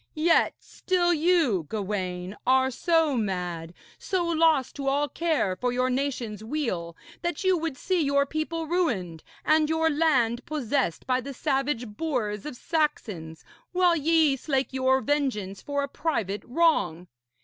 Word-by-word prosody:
Yet 330 Hz, +2 st, +3 dB
still 350 Hz, -2 st, 0 dB
you, 310 Hz, -, +2 dB
Gawaine, 190 Hz, -3 st, -3 dB
are 260 Hz, 0 st, +4 dB
so 325 Hz, +1 st, +2 dB
mad, 180 Hz, -6 st, -3 dB, 0.3 s
so 370 Hz, -3 st, -1 dB
lost 320 Hz, -5 st, +2 dB
to 275 Hz, -1 st, -4 dB
all 285 Hz, +2 st, +2 dB
care 310 Hz, -, 0 dB
for 250 Hz, +5 st, -1 dB
your 255 Hz, +1 st, +1 dB
nation's 250 Hz, -6 st, -2 dB
weal, 220 Hz, -, -3 dB, 0.2 s
that 345 Hz, -1 st, -2 dB
you 375 Hz, -1 st, +4 dB
would 325 Hz, -5 st, -3 dB
see 365 Hz, +5 st, 0 dB
your 280 Hz, -1 st, +2 dB
people 315 Hz, +3 st, -3 dB
ruined 230 Hz, -, -1 dB, 0.2 s
and 310 Hz, 0 st, +3 dB
your 320 Hz, 0 st, +2 dB
land 255 Hz, -6 st, +2 dB
possessed 270 Hz, -, -1 dB
by 255 Hz, 0 st, +1 dB
the 275 Hz, +1 st, -7 dB
savage 265 Hz, -2 st, -1 dB
boars 215 Hz, -3 st, -3 dB
of 300 Hz, -, -6 dB
Saxons, 215 Hz, -, -2 dB, 0.3 s
while 360 Hz, -1 st, +4 dB
ye 315 Hz, -2 st, +3 dB
slake 270 Hz, -1 st, -1 dB
your 265 Hz, 0 st, +2 dB
vengeance 255 Hz, -10 st, -1 dB
for 285 Hz, 0 st, -2 dB
a -, -, -2 dB
private 225 Hz, -, -2 dB
wrong. 245 Hz, -, +1 dB
275 Hz, 145 wpm, -26 LUFS, 215-320 Hz, 0.3 s, are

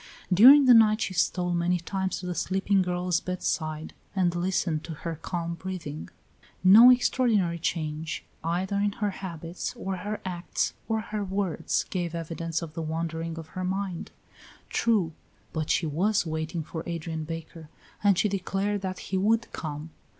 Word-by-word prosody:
During 265 Hz, +9 st, +9 dB
the 250 Hz, -, +8 dB
night 215 Hz, -2 st, +6 dB
she 195 Hz, -, -1 dB
stole 180 Hz, 0 st, +1 dB
many 175 Hz, +1 st, +1 dB
times 190 Hz, +2 st, -2 dB
to -, -, -7 dB
the 180 Hz, -, -2 dB
sleeping 190 Hz, +2 st, +1 dB
girl's 180 Hz, -1 st, 0 dB
bedside 160 Hz, -4 st, -3 dB, 0.2 s
and 180 Hz, -3 st, +2 dB
listened 175 Hz, -3 st, 0 dB
to 165 Hz, -, -6 dB
her 165 Hz, -1 st, -2 dB
calm 170 Hz, -1 st, -3 dB
breathing. 170 Hz, -4 st, -6 dB, 0.5 s
No 215 Hz, +7 st, +9 dB
extraordinary 230 Hz, -8 st, +3 dB
change, 155 Hz, -1 st, -3 dB, 0.2 s
either 180 Hz, +4 st, -1 dB
in 205 Hz, 0 st, +1 dB
her 210 Hz, -1 st, -1 dB
habits, 170 Hz, -2 st, -6 dB
or 190 Hz, 0 st, -3 dB
her 205 Hz, +4 st, -4 dB
acts, 175 Hz, -1 st, -2 dB, 0.2 s
or 220 Hz, 0 st, +1 dB
her 215 Hz, -1 st, -4 dB
words, 190 Hz, -3 st, -1 dB
gave 175 Hz, -3 st, -2 dB
evidence 165 Hz, 0 st, -3 dB
of 155 Hz, -2 st, -7 dB
the 165 Hz, -, -4 dB
wandering 165 Hz, +1 st, -3 dB
of 160 Hz, -1 st, -8 dB
her 185 Hz, -, -5 dB
mind. 190 Hz, -1 st, -3 dB, 0.6 s
True; 205 Hz, -9 st, +1 dB, 0.4 s
but 155 Hz, -2 st, -2 dB
she 170 Hz, -, +2 dB
was 185 Hz, +7 st, +1 dB
waiting 160 Hz, +1 st, -3 dB
for 160 Hz, +1 st, -6 dB
Adrian 165 Hz, -1 st, -4 dB
Baker 165 Hz, 0 st, -8 dB, 0.3 s
and 200 Hz, -3 st, +5 dB
she 210 Hz, -, +3 dB
declared 195 Hz, +1 st, -1 dB
that 185 Hz, -1 st, -3 dB, 0.2 s
he -, -, +3 dB
would 225 Hz, +4 st, +1 dB
come. 155 Hz, 0 st, -5 dB
180 Hz, 160 wpm, -27 LUFS, 165-195 Hz, 0.6 s, During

